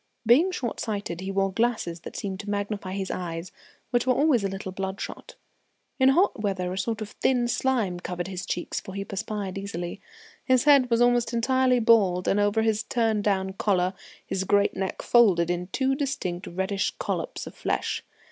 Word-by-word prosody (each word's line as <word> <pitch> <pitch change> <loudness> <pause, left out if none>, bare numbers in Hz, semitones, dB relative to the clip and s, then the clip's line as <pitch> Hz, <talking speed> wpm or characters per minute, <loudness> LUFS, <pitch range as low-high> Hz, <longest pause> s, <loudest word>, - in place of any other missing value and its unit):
Being 270 - +5
short 255 -11 -3
sighted, 200 -5 -3
he 190 - -4
wore 195 0 0
glasses 220 -6 0
that - - -10
seemed 190 -2 -4
to 205 - -6
magnify 200 -2 -3
his 195 -1 -3
eyes, 170 -1 -5 0.4
which 245 0 +1
were 255 - +4
always 280 -7 +3
a - - +1
little 195 0 -5
bloodshot. 190 +1 -6 0.6
In 260 0 +6
hot 335 - +3
weather 185 -3 -1
a - - -5
sort 225 +1 -2
of 210 - -4
thin 245 -2 +1
slime 240 -7 0
covered 175 0 -4
his 185 -1 -6
cheeks, 175 - -2
for 190 - -9
he 200 0 -3
perspired 200 -1 -4
easily. 190 -1 -5 0.4
His 255 -2 +3
head 280 -4 +6
was 230 0 +2
almost 245 -1 +2
entirely 255 +2 +3
bald, 205 -6 +4
and 205 - +3
over 205 +2 +2
his 220 -1 +1
turn 225 -3 0
down 190 -2 0
collar 185 -2 +1 0.3
his 190 - -2
great 200 +1 +2
neck 190 0 -3
folded 185 -8 +4
in 175 0 -2
two 265 +6 0
distinct 255 - -3
reddish 190 +3 -1
collops - - -3
of - - -9
flesh. - - -2
205 Hz, 185 wpm, -26 LUFS, 190-240 Hz, 0.6 s, In